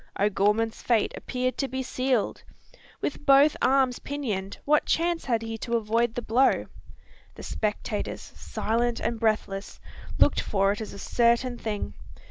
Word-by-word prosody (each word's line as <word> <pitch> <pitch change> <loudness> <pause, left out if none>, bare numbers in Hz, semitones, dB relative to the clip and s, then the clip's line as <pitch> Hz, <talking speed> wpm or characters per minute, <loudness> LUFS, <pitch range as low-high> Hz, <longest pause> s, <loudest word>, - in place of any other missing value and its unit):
O'Gorman's 210 +2 +1
fate 235 -3 +1
appeared 255 0 -3
to 275 - +1
be 260 0 -3
sealed. 255 -2 -1 0.6
With 295 - -3
both 280 +2 +6
arms 260 -2 +3
pinioned, 210 -9 -4
what 300 +1 +3
chance 340 0 +1
had 230 -3 0
he 225 0 -5
to 235 +1 -2
avoid 230 +2 0
the 245 - -3
blow? 250 +5 +3 0.7
The - - -10
spectators, 210 -1 -3
silent 235 +2 -1
and 235 -1 -2
breathless, 215 -3 -1 0.4
looked - - +4
for 195 -1 +1
it 205 - -4
as 215 - -6
a - - -9
certain 235 +4 +2
thing. 210 -2 -3
235 Hz, 145 wpm, -26 LUFS, 215-260 Hz, 0.7 s, both